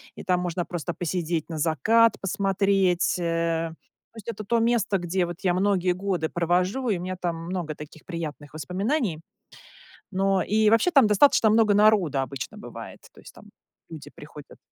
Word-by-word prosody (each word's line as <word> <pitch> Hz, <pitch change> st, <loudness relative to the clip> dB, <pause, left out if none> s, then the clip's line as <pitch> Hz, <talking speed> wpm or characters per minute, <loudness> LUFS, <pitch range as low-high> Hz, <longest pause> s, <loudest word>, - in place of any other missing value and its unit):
и -, -, -9 dB
там 180 Hz, -2 st, +1 dB
можно 175 Hz, -1 st, -3 dB
просто 175 Hz, 0 st, -4 dB
посидеть, 170 Hz, -2 st, -3 dB
на 160 Hz, -, -5 dB
закат 195 Hz, -, +3 dB
посмотреть, 195 Hz, -2 st, +1 dB
э. 165 Hz, -1 st, -1 dB, 0.4 s
То -, -, -17 dB
есть 215 Hz, -, -11 dB
это 220 Hz, -2 st, -5 dB
то 235 Hz, +4 st, +1 dB
место, 225 Hz, -4 st, +1 dB
где 175 Hz, 0 st, -1 dB
вот 175 Hz, -, -6 dB
я 185 Hz, -3 st, +1 dB
многие 185 Hz, -1 st, +1 dB
годы 180 Hz, -3 st, -2 dB
провожу, 180 Hz, +9 st, 0 dB
и 200 Hz, -, +1 dB
у -, -, -7 dB
меня 185 Hz, +1 st, -5 dB
там 175 Hz, -2 st, -1 dB
много 170 Hz, -3 st, -4 dB
таких 150 Hz, +1 st, -12 dB
приятных 155 Hz, -4 st, -7 dB
воспоминаний. 185 Hz, -, -2 dB, 0.9 s
Но 195 Hz, 0 st, +1 dB
и 215 Hz, +1 st, +2 dB
вообще 230 Hz, +10 st, +3 dB
там 275 Hz, -9 st, +5 dB
достаточно 225 Hz, +2 st, +4 dB
много 215 Hz, -1 st, +4 dB
народа 200 Hz, -9 st, +3 dB
обычно 135 Hz, -2 st, -6 dB
бывает, -, -, -10 dB
то -, -, -17 dB
есть -, -, -14 dB
там -, -, -16 dB, 0.4 s
люди 160 Hz, -3 st, -10 dB
приходят 150 Hz, -1 st, -13 dB
180 Hz, 170 wpm, -25 LUFS, 165-210 Hz, 0.9 s, там